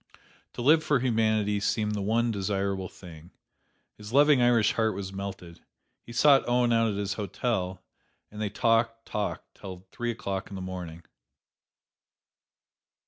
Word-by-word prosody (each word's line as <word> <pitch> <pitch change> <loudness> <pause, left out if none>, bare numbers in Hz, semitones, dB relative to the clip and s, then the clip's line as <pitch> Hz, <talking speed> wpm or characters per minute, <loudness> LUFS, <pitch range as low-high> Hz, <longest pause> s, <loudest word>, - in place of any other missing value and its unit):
To 120 - -5
live 155 +4 +5
for 145 -3 +2
humanity 110 -4 +1
seemed 105 +1 0
the 105 - -2
one 115 +4 +1
desirable 100 -2 -2
thing. 85 -2 -13 0.7
His 105 +1 -9
loving 145 0 +5
Irish 120 -3 +4
heart 110 -2 +1
was 95 -1 -6
melted. 95 -3 -7 0.4
He - - -13
sought 135 +2 +4
Owen 120 -1 +3
out 115 0 +3
at 100 - -4
his 100 -1 -2
hotel, 95 -3 -3 0.5
and 105 0 -7
they 105 - -1
talked, 115 +1 +1
talked 105 -1 -4
till 95 -1 -9
three 120 0 -3
o'clock 100 -4 -4
in 100 - -8
the - - -5
morning. 90 -3 -7
105 Hz, 145 wpm, -28 LUFS, 95-115 Hz, 0.7 s, live